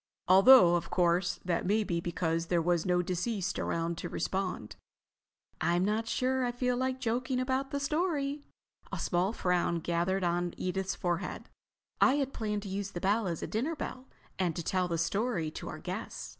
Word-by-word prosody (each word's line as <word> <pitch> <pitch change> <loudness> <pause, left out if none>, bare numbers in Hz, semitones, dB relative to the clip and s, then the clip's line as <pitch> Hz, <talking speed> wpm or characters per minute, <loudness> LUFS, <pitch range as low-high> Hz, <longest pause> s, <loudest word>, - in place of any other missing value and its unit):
Although, 190 0 +8
of 170 - -5
course, 175 0 +1
that 175 -2 0
may 215 +2 +3
be 170 -4 -2
because 165 -1 -1
there 175 0 +2
was 170 +1 +1
no 180 0 +2
deceased 185 +1 -2
around 165 0 -2
to 175 - -5
respond." 185 - -3 0.9
"I'm 175 +3 +2
not 220 +2 0
sure 260 +2 0
I 245 - 0
feel 250 0 0
like 260 +1 -1
joking 255 +1 -1
about 260 +1 -1
the 280 - -2
story." 295 -1 -1 0.5
A - - -3
small 180 +3 0
frown 180 -5 +1
gathered 175 +3 0
on 175 0 0
Edith's 190 +1 -2
forehead. 175 0 -3 0.5
"I 270 - +6
had 275 -2 -1
planned 210 -2 -2
to - - -7
use 195 +1 -3
the 175 - -3
bell 205 +3 +1
as 170 -3 -3
a - - -3
dinner 270 +10 -1
bell 260 -2 -6 0.3
and 175 -4 0
to 170 - -3
tell 185 +2 0
the 170 -1 -1
story 175 -2 -1
to - - -7
our - - -6
guests. - - -6
190 Hz, 185 wpm, -31 LUFS, 175-250 Hz, 0.9 s, Although